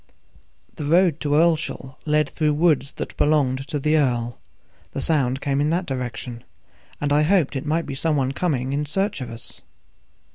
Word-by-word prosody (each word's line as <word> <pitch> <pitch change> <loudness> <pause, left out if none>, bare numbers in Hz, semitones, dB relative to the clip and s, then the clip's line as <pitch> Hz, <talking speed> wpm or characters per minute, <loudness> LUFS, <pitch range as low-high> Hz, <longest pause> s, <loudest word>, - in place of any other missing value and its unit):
The 150 - -4
road 165 0 +3
to 145 -1 0
Earlshall 155 -4 +1
led 150 -1 +3
through 150 +1 0
woods 150 -4 +2
that - - -6
belonged 135 -3 +2
to 150 - -2
the 150 +2 +2
earl; 120 -4 0 0.5
the - - -3
sound 135 -3 +1
came 140 -1 0
in 150 - +2
that 175 +3 0
direction, 125 -3 -5 0.6
and 145 0 0
I 150 - +4
hoped 160 -3 +2
it 135 +2 -3
might 165 +2 +1
be - - -5
some 155 +3 0
one 135 -2 +1
coming 135 -4 -1
in 145 +1 -1
search 195 0 -1
of 125 - -5
us. 115 0 -8
145 Hz, 180 wpm, -23 LUFS, 135-155 Hz, 0.6 s, I